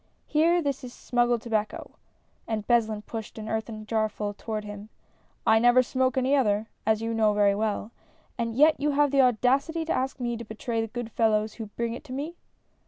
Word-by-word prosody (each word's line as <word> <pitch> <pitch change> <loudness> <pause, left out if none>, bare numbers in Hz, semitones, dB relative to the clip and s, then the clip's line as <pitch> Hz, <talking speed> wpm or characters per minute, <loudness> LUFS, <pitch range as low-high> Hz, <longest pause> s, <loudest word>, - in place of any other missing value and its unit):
Here, 335 +3 +3
this 280 -2 -2
is 245 -1 -8
sinnggiecl 240 -1 +1
tobacco, 215 -2 -3 0.6
(and 215 -2 -2
Beslin 220 -3 +1
pushed 225 0 -7
an 215 0 -6
earthen 220 -1 -4
jarfull 215 -2 -1
toward 215 -1 -4
him) 205 0 -8 0.6
I 220 - +5
never 245 +2 +5
smoke 260 +1 0
any 260 +2 +3
other, 215 -5 +2 0.2
as 220 0 +2
you 230 0 -1
know 215 -2 +2
very 205 -1 +4
well, 210 +1 -2 0.4
and 230 -1 -3
yet 300 +4 +5
you 295 +1 +1
have 290 0 +3
the 275 -1 +5
audacity 265 +7 +2
to 325 - 0
ask 265 +1 -2
me 240 -1 -2
to 235 - -6
betray 225 +1 -3
the 225 - -2
good 235 0 -6
fellows 215 -1 +1
who 225 -2 -7
bring 230 +3 -3
it 240 - -8
to 255 - -8
me 295 +6 -4
230 Hz, 195 wpm, -27 LUFS, 215-260 Hz, 0.6 s, I